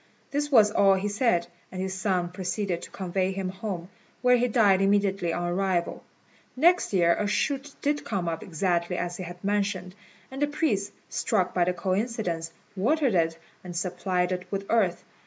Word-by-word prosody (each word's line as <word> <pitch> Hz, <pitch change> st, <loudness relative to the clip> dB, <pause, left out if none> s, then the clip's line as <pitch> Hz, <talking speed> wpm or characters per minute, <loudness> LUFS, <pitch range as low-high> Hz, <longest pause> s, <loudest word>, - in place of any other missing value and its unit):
This 290 Hz, +1 st, -1 dB
was 215 Hz, -5 st, +6 dB
all 195 Hz, -2 st, +5 dB
he 190 Hz, +2 st, -1 dB
said, 205 Hz, -4 st, +2 dB, 0.3 s
and 185 Hz, -, -6 dB
his 190 Hz, 0 st, -2 dB
son 185 Hz, -2 st, 0 dB
proceeded 180 Hz, 0 st, -2 dB
to -, -, -9 dB
convey 190 Hz, 0 st, -1 dB
him 190 Hz, -1 st, -3 dB
home, 185 Hz, -3 st, -5 dB, 0.4 s
where 250 Hz, 0 st, +6 dB
he 245 Hz, 0 st, +2 dB
died 205 Hz, -5 st, +4 dB
immediately 195 Hz, -3 st, +2 dB
on 175 Hz, +1 st, -2 dB
arrival. 180 Hz, -1 st, 0 dB, 0.5 s
Next 345 Hz, +7 st, +4 dB
year 170 Hz, -3 st, +4 dB
a 210 Hz, -, 0 dB
shoot 275 Hz, +6 st, -1 dB
did 290 Hz, +1 st, +1 dB
come 190 Hz, -5 st, -2 dB
up 165 Hz, -1 st, -2 dB
exactly 175 Hz, 0 st, -1 dB
as 175 Hz, 0 st, -3 dB
he 185 Hz, -, -5 dB
had 175 Hz, 0 st, -9 dB
mentioned; 195 Hz, -3 st, -1 dB, 0.4 s
and 270 Hz, +1 st, -6 dB
the 290 Hz, -, +3 dB
priests, 240 Hz, -10 st, 0 dB, 0.2 s
struck 185 Hz, -1 st, 0 dB
by 175 Hz, -1 st, +3 dB
the 180 Hz, -, +1 dB
coincidence, 185 Hz, -3 st, -2 dB, 0.2 s
watered 265 Hz, +5 st, +2 dB
it 165 Hz, -2 st, +2 dB, 0.3 s
and 180 Hz, -1 st, -8 dB
supplied 180 Hz, 0 st, -1 dB
it 180 Hz, 0 st, -3 dB
with 195 Hz, 0 st, -3 dB
earth. 195 Hz, -7 st, +2 dB
190 Hz, 175 wpm, -27 LUFS, 180-210 Hz, 0.5 s, was